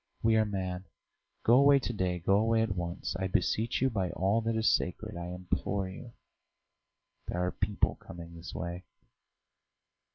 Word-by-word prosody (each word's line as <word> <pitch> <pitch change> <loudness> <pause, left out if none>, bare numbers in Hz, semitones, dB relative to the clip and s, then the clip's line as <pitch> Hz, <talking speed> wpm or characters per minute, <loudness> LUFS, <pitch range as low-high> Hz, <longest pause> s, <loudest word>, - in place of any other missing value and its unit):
"We 115 0 +4
are 110 0 +4
mad. 95 -2 -3 0.6
Go 120 +3 +6
away 140 0 +7
to 120 -3 -2
day; 90 -4 0
go 95 +3 +3
away 110 +1 +3
at 110 -3 -1
once.... 85 +1 -3
I 95 - 0
beseech 110 +6 +1
you 130 - +3
by 95 -5 0
all 100 +6 +1
that 115 0 -1
is 110 0 +1
sacred, - - 0
I 85 0 -5
implore 90 +2 -2
you.... 115 +5 -10 1.1
There 90 0 -1
are 90 - 0
people 105 +1 0
coming 85 -1 -10
this 85 +2 -9
way!" 85 +1 -4
95 Hz, 165 wpm, -31 LUFS, 90-110 Hz, 1.1 s, away